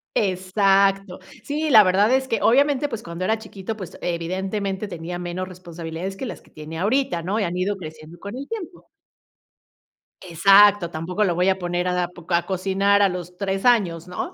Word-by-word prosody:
Exacto. 195 0 +1 0.2
Sí, 305 +2 -2
la 220 -6 +8
verdad 195 +4 +3
es 265 0 +2
que 230 - 0
obviamente, 285 +3 +3
pues 225 -2 -6
cuando 170 +2 -6
era 220 +4 +1
chiquito, 215 -1 -7
pues 185 -5 -9
evidentemente 190 +4 -3
tenía 175 -1 -6
menos 180 +1 -4
responsabilidades 175 0 -7
que 265 - -5
las 240 - -7
que - - -23
tiene 155 +1 -8
ahorita, 205 -3 0
¿no? 195 +6 -2
Y - - 0
han 175 -2 -2
ido 195 +3 -1
creciendo 155 -1 -10
con 200 +6 -7
el 275 - -7
tiempo. 375 -6 -8 1.3
Exacto, 195 +2 +5
tampoco 170 +5 -2
lo 175 -4 +1
voy 180 +1 +1
a 190 0 0
poner 175 0 -2
a 180 - 0
da 180 -1 0
po 175 -1 -15
a 170 -1 +3
cocinar 195 +2 +1
a 200 - +4
los 180 -1 -7
3 195 +1 -2
años, 185 -9 +2
¿no? 180 0 -5
190 Hz, 190 wpm, -22 LUFS, 175-205 Hz, 1.3 s, la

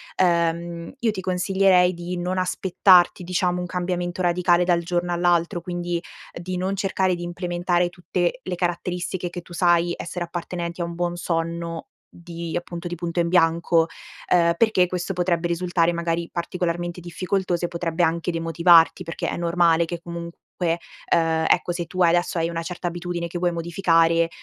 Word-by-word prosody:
ehm, 170 0 0
io 230 -3 +1
ti 190 - -5
consiglierei 185 0 +3
di 175 +1 -5
non 180 +1 -2
aspettarti, 185 0 +3
diciamo, 180 0 0
un - - -3
cambiamento 180 0 -3
radicale 175 0 +3
dal 175 -1 +2
giorno 175 +1 -1
all'altro, 175 0 +1
quindi 175 0 -3 0.3
di 180 +1 -5
non 190 +2 -1
cercare 190 -1 0
di 175 - -7
implementare 175 0 -1
tutte 175 +6 -2
le 185 -1 -3
caratteristiche 175 +1 -2
che 175 0 -7
tu 175 - -14
sai 175 0 +3
essere 175 +1 -4
appartenenti 170 0 -5
a - - +1
un 170 0 -5
buon 175 0 -1
sonno, 170 -1 -3 0.3
di 170 -1 -6
appunto, 175 0 -6
di 175 - -4
punto 170 +1 -3
in 170 - 0
bianco, 165 -1 +3 0.4
ehm, 170 -1 +4
perché 215 -4 +3
questo 180 +1 -3
potrebbe 175 -1 0
risultare 170 0 +1
magari 170 0 -2
particolarmente 175 0 -3
difficoltoso 175 0 -2
e - - -1
potrebbe 170 0 -1
anche 170 +1 0
demotivarti, 165 +1 +4
perché 165 -1 -4
è - - -3
normale 170 -1 +3
che 170 +1 -5
comunque, 170 0 -7 0.7
ehm, 165 -1 +2
ecco 175 0 +2
se 175 0 -3
tua 180 +1 +2
adesso 175 +1 +1
hai 165 0 +1
una 165 0 -3
certa 175 +1 -5
abitudine 175 0 -3
che 175 - -5
vuoi 175 0 +1
modificare, 165 -1 +2
175 Hz, 165 wpm, -23 LUFS, 170-180 Hz, 0.7 s, ehm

